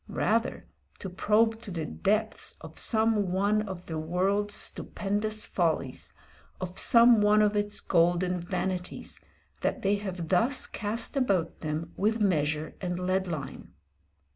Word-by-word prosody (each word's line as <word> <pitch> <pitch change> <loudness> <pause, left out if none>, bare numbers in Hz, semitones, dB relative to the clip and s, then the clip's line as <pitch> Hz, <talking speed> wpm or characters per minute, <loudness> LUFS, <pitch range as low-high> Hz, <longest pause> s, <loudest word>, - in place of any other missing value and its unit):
Rather, 225 +2 0 0.3
to 190 - -7
probe 220 +4 +2
to 215 - -9
the 165 -4 -3
depths 210 +6 -1
of - - -7
some 220 -4 +2
one 200 +3 +2
of 185 -1 -7
the 160 -1 -4
world's 195 +6 0
stupendous 210 +2 -1
follies, 160 -7 -1 0.5
of 185 0 -3
some 235 -1 +6
one 210 +1 +5
of 210 0 +2
its 205 0 0
golden 175 +1 +2
vanities, 180 0 -3 0.4
that - - -1
they 200 +1 +2
have 185 -5 -5
thus 235 +9 +2
cast 220 +6 -2
about 195 -11 0
them 155 +2 -4
with 220 +3 +1
measure 155 -6 0
and 180 -2 -2
lead 185 +1 0
line. 145 -6 -6
190 Hz, 140 wpm, -28 LUFS, 175-210 Hz, 0.5 s, some